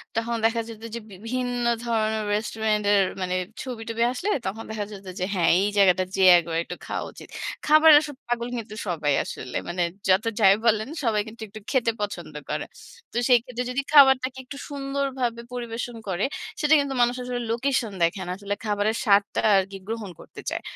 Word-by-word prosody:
তখন 230 +1 -1
দেখা 230 +1 +2
যেত 225 -1 -10
যে, - - -3
বিভিন্ন 245 +5 -3 0.2
ধরনের 220 -2 0
রেস্টুরেন্ট 215 0 -1
এর 200 -1 +5 0.2
মানে 185 0 -1 0.3
ছবি-টবি 230 -2 -3
আসলে 365 +10 -3 0.2
তখন 220 +4 -4
দেখা 215 -2 -3
যেত 200 -1 -10
যে, 180 - 0
হ্যাঁ, 170 -3 +3
এই 200 - +2
জায়গাটা 185 -2 +5
যেয়ে 190 -1 +7
একবার 165 -1 -3
একটু - - -7
খাওয়া - - -3
উচিত। - - -12 0.4
খাবারের 310 0 +8
আসলে 290 -3 -7
পাগল 240 0 -1
কিন্তু 220 -2 -7
সবাই 150 -5 0
আসলে। 125 - -6
মানে 175 +1 0 0.3
যত 190 +4 +4
যাই 195 -2 +7
বলেন, 220 -1 +3 0.2
সবাই 220 -3 +2
কিন্তু 225 +1 -11
একটু 210 +2 -10
খেতে 245 -4 +2
পছন্দ 180 -6 -4 0.2
করে। - - -2 0.5
তো - - -3
সেই 245 -1 +7
ক্ষেত্রে 250 0 -4
যদি 265 +2 0
খাবারটাকে 265 -3 +6
একটু 280 +2 -9
সুন্দরভাবে 275 -4 -2
পরিবেশন 240 0 -4
করে, 190 0 0 0.3
সেটা 300 -1 +3
কিন্তু 280 -1 -1
মানুষ 240 +1 +3
আসলে 245 0 -3
লোকেশন 240 -2 0
দেখে 170 +3 +1
না। - - -3
আসলে 200 0 -3
খাবারের 210 +1 0
স্বাদটা 200 -2 +3 0.2
আরকি 195 +1 -1
গ্রহণ 220 -3 -4
করতে - - -11
চায়। - - -3
225 Hz, 180 wpm, -25 LUFS, 200-250 Hz, 0.5 s, খাবারের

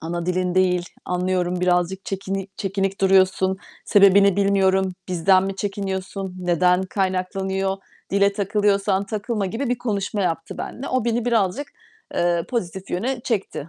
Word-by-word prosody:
ana 170 +1 -4
dilin 180 0 0
değil, 180 -1 +2 0.2
anlıyorum, 180 0 -1
birazcık 180 +1 +1
çekini 195 0 -4
çekinik 195 0 -2
duruyorsun. 190 0 +3 0.3
Sebebini 200 -1 +5
bilmiyorum, 190 -1 +2 0.2
bizden 185 +2 +3
mi 195 0 -4
çekiniyorsun, 195 -1 -4
neden 180 +1 +2
kaynaklanıyor? 190 0 -1 0.3
Dile 200 +1 +3
takılıyorsan, 200 -1 +1
takılma." 210 0 -2
gibi 235 +7 -3
bir 245 -1 0
konuşma 205 -3 -2
yaptı 165 -2 -3
benimle. 270 - -5
O 255 -3 0
beni 235 0 0
birazcık, 230 +2 +1 0.5
eee, 175 -1 +1
pozitif 190 -5 -4
yöne 240 +7 -2
çekti. 195 - -3
190 Hz, 130 wpm, -22 LUFS, 185-200 Hz, 0.5 s, Sebebini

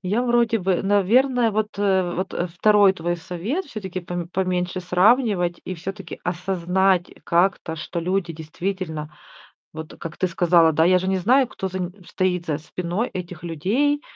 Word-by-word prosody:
я 205 +7 0
вроде 235 -2 +2
бы, 185 -1 0
наверное, 230 +5 +3
вот, 215 -1 -2
э, 190 -3 +2
вот 185 +1 -3 0.2
2 205 +1 +5
твой 175 -1 -2
совет 185 - -4
всё-таки: 190 -8 -6
пом 175 -1 -5
поменьше 185 -1 -1
сравнивать 180 -1 +2
и 185 - -4
всё-таки 185 +1 -7
осознать 180 +1 +1
как-то, 170 -2 +1
что 165 +2 -4
люди 180 0 -1
действительно 160 0 -5 0.6
Вот, 160 0 -8
как 160 -2 -7
ты 185 - +1
сказала, 170 -1 +4
да, 160 +2 +3
я 185 0 +5
же 185 - -3
не 190 - +1
знаю, 250 +8 +3
кто 190 - -5
за 185 0 -5
нь 180 0 -3 0.2
стоит 180 -2 -1
за 150 -3 -1
спиной 180 +8 -3
этих 175 -2 -7
людей. 230 - 0
185 Hz, 160 wpm, -23 LUFS, 175-200 Hz, 0.6 s, 2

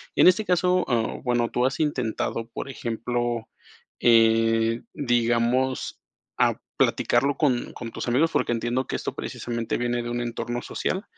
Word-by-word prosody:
En - - +6
este 185 +4 +4
caso, 180 0 +2
ah, 115 -3 0
bueno, 120 -2 +1
tú 125 - +1
has 135 - -1
intentado, 120 -5 -1
por 130 - -6
ejemplo, 120 -1 -2 0.5
eh, 115 0 +4
digamos, 120 0 0 0.4
ah, - - +3 0.2
platicarlo 140 0 +2
con 130 -6 0
con 115 - -7
tus - - -5
amigos, 140 +7 +2
porque, - - +1
entiendo 120 +2 -1
que - - -3
esto - - -3
precisamente 115 -1 -3
viene 120 0 -1
de 120 - -4
un 120 0 -2
entorno 120 0 -3
social. 185 +9 -3
120 Hz, 150 wpm, -25 LUFS, 115-130 Hz, 0.5 s, En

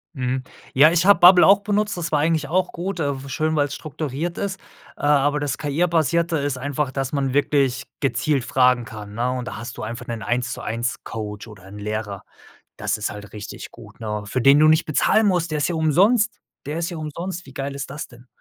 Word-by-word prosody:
Mhm. 130 0 -2 0.3
Ja, 150 +4 +7
ich 175 +1 +2
habe 200 -4 +7
Bubble 180 +1 +8
auch 200 0 +6
benutzt, 210 -1 0
das 170 -1 -3
war 150 - +2
eigentlich 155 -1 +1
auch 180 +3 0
gut, 180 +1 -4
äh, 140 -3 -2
w 140 - -9
schön, 155 +4 0
weil 145 -1 +2
es - - -8
strukturiert 155 +2 -4
ist, 195 -2 -3 0.4
äh, - - -11
aber 145 0 +3
das 145 -1 -2
KI-basierte 165 +1 +1
ist 140 -2 -2
einfach, 145 0 -2
dass 135 +1 -3
man 135 -2 0
wirklich 140 -3 +1
gezielt 140 -1 0
fragen 125 -2 +3
kann, 105 -1 -9
ne, 125 +2 0
und 125 -1 -4
da - - -6
hast 120 +1 -7
du - - -6
einfach 115 +2 -6
'nen 115 -2 -5
Eins-zu-eins-Coach 115 -2 -3
oder 100 -4 -13
'n 100 +2 -10
Lehrer. 105 -1 -4 0.6
Das - - -1
ist 105 - -3
halt 105 0 -11
richtig 105 -1 -8
gut, - - -15
ne? 105 -2 -3
Für 130 +5 -2
den 140 +3 +6
du 155 - +6
nicht 155 +1 +4
bezahlen 210 +8 +3
musst, 175 -3 0
der 150 - 0
ist 145 - +1
ja 175 - -2
umsonst, 205 - +3 0.3
der 150 +3 -3
ist 170 +1 -2
ja 170 - -6
umsonst, 170 +4 -5
wie 135 - -13
geil 140 0 -4
ist 140 -1 -6
das 150 +3 -6
denn? 120 0 -17
145 Hz, 220 wpm, -22 LUFS, 125-165 Hz, 0.6 s, Bubble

